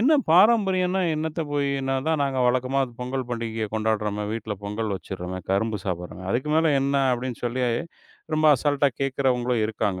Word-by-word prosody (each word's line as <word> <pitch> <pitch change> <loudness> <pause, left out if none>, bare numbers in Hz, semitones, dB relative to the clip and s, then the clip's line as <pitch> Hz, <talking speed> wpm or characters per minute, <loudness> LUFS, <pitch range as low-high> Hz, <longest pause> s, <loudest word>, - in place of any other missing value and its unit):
"என்ன 270 +7 +4 0.2
பாரம்பரியன்னா 190 -2 +4
என்னத்த 160 +1 -3
போய் 140 -1 +1
இன்னா. 135 0 -1
அதான் 155 -1 +1
நாங்க 135 -1 -2
வழக்கமா 130 +2 +1 0.2
பொங்கல் 125 0 -3
பண்டிகைய 115 -2 -3
கொண்டாடறமே, 105 -1 -1
வீட்ல 110 -2 -4
பொங்கல் 105 +1 -3
வெச்சிரமே, 95 -1 -6
கரும்பு 105 +1 0
சாப்பிடறமே. 90 0 -5
அதுக்கு 130 +5 -1
மேல 160 -3 +3
என்ன" 140 +1 0 0.2
அப்டின்னு 125 0 -5
சொல்லி 125 +2 -1 0.7
ரொம்ப 155 0 +3
அசால்ட்டா 145 +1 +2
கேக்குறவங்களும் 125 -3 +1
இருக்காங்க. 105 -4 -2
125 Hz, 150 wpm, -24 LUFS, 110-145 Hz, 0.7 s, என்ன